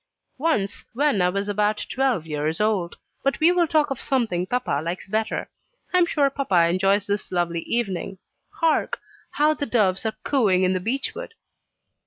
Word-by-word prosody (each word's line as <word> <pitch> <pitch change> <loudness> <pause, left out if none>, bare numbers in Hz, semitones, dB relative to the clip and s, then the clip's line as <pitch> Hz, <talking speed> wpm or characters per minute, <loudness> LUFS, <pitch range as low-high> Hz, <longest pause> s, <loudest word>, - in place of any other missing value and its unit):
"Once, 225 -10 0
when 275 -5 +2
I 180 - +3
was 200 +2 -2
about 210 +1 0
twelve 260 - 0
years 155 +1 -2
old. 210 -5 0 0.3
But 275 - 0
we 325 +2 +5
will 355 -1 +2
talk 305 -2 +2
of 270 - -3
something 220 -9 0
papa 245 - -1
likes 170 +4 -4
better. 220 +2 -1 0.5
I 365 - +5
am 345 - +4
sure 285 -4 +2
papa 190 -12 +2
enjoys 195 +3 +2
this 205 -1 -3
lovely 175 -2 0
evening. 195 -5 -2 0.3
Hark! 325 -2 0 0.3
how 300 +1 +2
the 285 -2 -4
doves 200 -5 +2
are 220 - -4
cooing 205 -10 +2
in 185 0 +2
the 185 - 0
beech 245 +9 -2
wood." 485 0 -8
215 Hz, 175 wpm, -24 LUFS, 185-275 Hz, 0.5 s, we